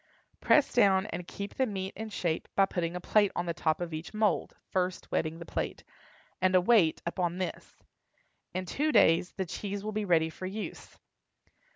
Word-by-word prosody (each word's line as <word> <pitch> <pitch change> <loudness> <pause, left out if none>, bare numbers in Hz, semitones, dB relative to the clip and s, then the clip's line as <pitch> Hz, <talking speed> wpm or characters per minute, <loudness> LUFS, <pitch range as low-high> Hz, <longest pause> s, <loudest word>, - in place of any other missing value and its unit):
Press 295 - +4
down 195 -5 +4
and 180 -3 -6
keep 200 0 -6
the 260 - +1
meat 190 -2 -4
in 220 +1 -5
shape 170 -5 -2
by 195 - +5
putting 175 -2 -2
a - - -2
plate 205 +2 +3
on 175 - -1
the 170 - -1
top 160 -2 0
of 175 -2 -4
each 160 +7 -6
mould 215 -1 +1 0.2
(first 185 -1 -1
wetting 160 +1 -1
the 170 - -8
plate) - - -4 0.6
and 185 0 +3
a - - +8
weight 180 -4 +3
upon 175 0 -1
this. 185 -1 -6 0.7
In 185 +1 -3
two 300 - 0
days 170 - +4
the 190 - -3
cheese 200 +3 -5
will 215 - -3
be 215 0 -2
ready 160 -3 +3
for 185 - -6
use. 205 +3 -7
185 Hz, 190 wpm, -30 LUFS, 170-205 Hz, 0.7 s, a